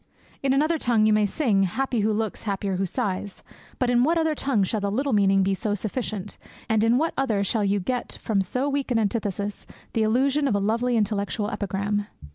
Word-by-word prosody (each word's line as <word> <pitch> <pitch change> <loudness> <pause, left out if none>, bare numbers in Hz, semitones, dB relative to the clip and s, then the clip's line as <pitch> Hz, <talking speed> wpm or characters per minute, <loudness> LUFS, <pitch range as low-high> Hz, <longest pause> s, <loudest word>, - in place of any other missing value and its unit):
In 275 - +1
another 310 +4 +2
tongue 230 -5 +2
you 215 - +4
may 210 -1 +3
sing, 215 -5 +1
"happy 235 +6 0
who 215 +1 +2
looks, 215 0 -2
happier 195 -2 -2
who 190 0 0
sighs"; 200 -2 -3 0.3
but 250 -1 +1
in 245 0 +4
what 330 +5 +2
other 320 -1 +2
tongue 270 -8 0
shall 215 +3 -1
the 200 - 0
little 265 +6 0
meaning 195 -2 +4
be 195 +1 +1
so 205 +2 -1
sufficient, 210 -1 -4 0.3
and 220 -2 +2
in 230 +2 +4
what 320 +4 0
other 220 -7 +1
shall 210 +2 0
you 200 0 +1
get 245 +6 -3
from 205 -3 0
so 250 +9 -1
weak 280 -1 -1
an 245 - +2
antithesis 205 -2 -2 0.3
the 225 - +1
illusion 270 +6 +2
of 225 - +1
a - - +2
lovely 230 +4 +1
intellectual 210 0 -1
epigram? 205 +1 -2
215 Hz, 210 wpm, -25 LUFS, 200-250 Hz, 0.3 s, you